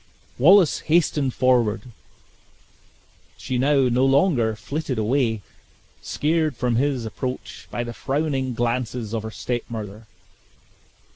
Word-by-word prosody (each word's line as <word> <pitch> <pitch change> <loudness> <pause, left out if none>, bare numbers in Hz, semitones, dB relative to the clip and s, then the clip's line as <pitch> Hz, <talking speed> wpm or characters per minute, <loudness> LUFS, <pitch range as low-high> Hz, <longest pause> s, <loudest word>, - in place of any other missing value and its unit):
Wallace 175 +4 +6
hastened 150 -4 +1
forward 120 -4 +2 1.5
she 125 -1 -3
now 140 +1 +3
no 125 +1 +2
longer 135 - +3
flitted 145 +2 -4
away, 110 -1 0 0.6
scared 155 -1 0
from 120 -2 0
his 135 -2 0
approach 125 +4 -6
by 120 - -3
the 120 0 -6
frowning 135 -2 -2
glances 120 -1 -2
of 115 - -1
her 110 - -6
step 120 +2 -3
mother. 110 -1 -7
125 Hz, 115 wpm, -23 LUFS, 115-140 Hz, 1.5 s, Wallace